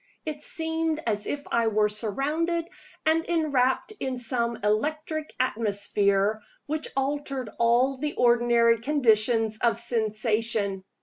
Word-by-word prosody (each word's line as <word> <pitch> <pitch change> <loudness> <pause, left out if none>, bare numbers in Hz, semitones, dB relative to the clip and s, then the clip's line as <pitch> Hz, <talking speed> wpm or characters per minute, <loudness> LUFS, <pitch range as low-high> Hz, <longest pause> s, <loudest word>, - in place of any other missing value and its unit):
It 300 -2 -5
seemed 320 0 -1
as 210 -2 -1
if 285 0 -4
I 230 -1 +2
were 215 -1 +2
surrounded 290 - -1 0.4
and 320 +1 +3
enwrapped 295 0 +1
in 260 -1 -3
some 235 -1 0
electric 305 +8 -1
atmosphere 205 -3 +1 0.2
which 310 +1 -3
altered 275 -3 -2
all 245 +3 +3
the 295 +2 -3
ordinary 235 -1 +4
conditions 225 -4 +2
of 235 -1 +2
sensation. 220 -3 0
240 Hz, 115 wpm, -26 LUFS, 220-295 Hz, 0.4 s, ordinary